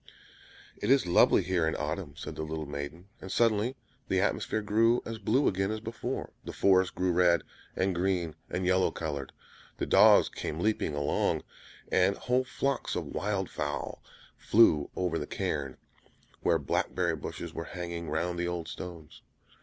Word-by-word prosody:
"It - - -3
is 135 -4 +5
lovely 90 - +5
here 90 -2 +1
in 80 - 0
autumn!" - - -4
said - - -6
the - - -5
little 80 0 -4
maiden. 70 +6 -7
And 95 - -7
suddenly 115 +2 +2 0.3
the - - +1
atmosphere 110 - 0
grew 115 +3 +3
as 115 -1 -5
blue 135 +5 +2
again 95 +1 +1
as 110 0 -2
before; 115 0 -5
the - - -6
forest 95 -1 +3
grew 90 0 +1
red, 85 0 +4 0.3
and 95 0 +1
green, 90 -2 0 0.2
and 90 +1 -2
yellow 95 0 +3
colored. 70 -4 -4 0.5
The - - -1
dogs - - +6
came 75 - -5
leaping 105 -6 0
along, 75 -1 0 0.5
and 95 +2 +3
whole 125 +1 +1
flocks 135 +1 -2
of - - -2
wild 100 -2 -1
fowl - - -4 0.4
flew 80 -10 +4
over 90 -3 -1
the - - -5
cairn, 70 -3 -3 0.6
where 85 - +3
blackberry 85 +3 0
bushes 80 +2 -6
were 80 - -5
hanging 85 -2 -5
round 85 +3 -1
the 85 - 0
old 85 -2 -3
stones. 85 -4 -9
90 Hz, 160 wpm, -30 LUFS, 80-105 Hz, 0.6 s, dogs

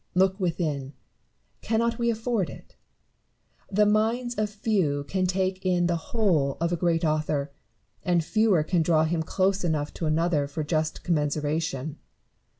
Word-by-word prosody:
Look 190 +2 +3
within: 155 -7 -2 0.7
cannot 230 +2 0
we 235 0 +2
afford 225 -4 -1
it - - -13 0.9
1 195 - -8
The 210 +1 +5
minds 225 +4 +1
of 215 -1 -1
few 195 -9 0
can 185 +5 -1
take 185 0 -1
in 180 -2 +2
the 175 0 +1
whole 170 - +1
of 170 +1 0
a - - +3
great 170 0 +1
author, 155 -2 0 0.5
and 175 -2 +2
fewer 215 -5 +3
can 170 +2 +1
draw 160 -1 +3
him 160 +1 0
close 190 +4 0
enough 155 -3 -1
to 165 - -3
another 155 -2 +1
for 150 +2 -4
just 155 0 -1
commensuration. 150 -2 -1
175 Hz, 150 wpm, -26 LUFS, 155-200 Hz, 0.9 s, The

